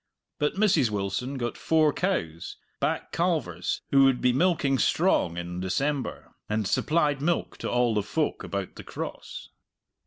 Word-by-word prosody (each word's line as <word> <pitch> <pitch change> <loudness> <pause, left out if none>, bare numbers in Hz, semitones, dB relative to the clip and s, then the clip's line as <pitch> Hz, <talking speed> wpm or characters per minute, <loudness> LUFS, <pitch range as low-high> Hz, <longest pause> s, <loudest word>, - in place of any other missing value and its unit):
But 150 - 0
Mrs. 185 - +3
Wilson 105 +7 -2
got 120 -2 -3
four 155 -2 +3
cows, 90 - -2 0.2
back - - -1
calvers 150 - -1
who 135 -1 +6
would 135 -2 +3
be 125 -1 +3
milking 140 -3 +2
strong 85 -5 +2
in 85 +1 -4
December, 135 +9 -2 0.2
and 105 0 0
supplied 150 - +1
milk 170 +3 0
to - - -3
all 120 -1 +2
the 105 - +1
folk 150 +9 -2
about 100 -2 -4
the - - -8
Cross. - - -7
130 Hz, 150 wpm, -27 LUFS, 100-155 Hz, 0.2 s, who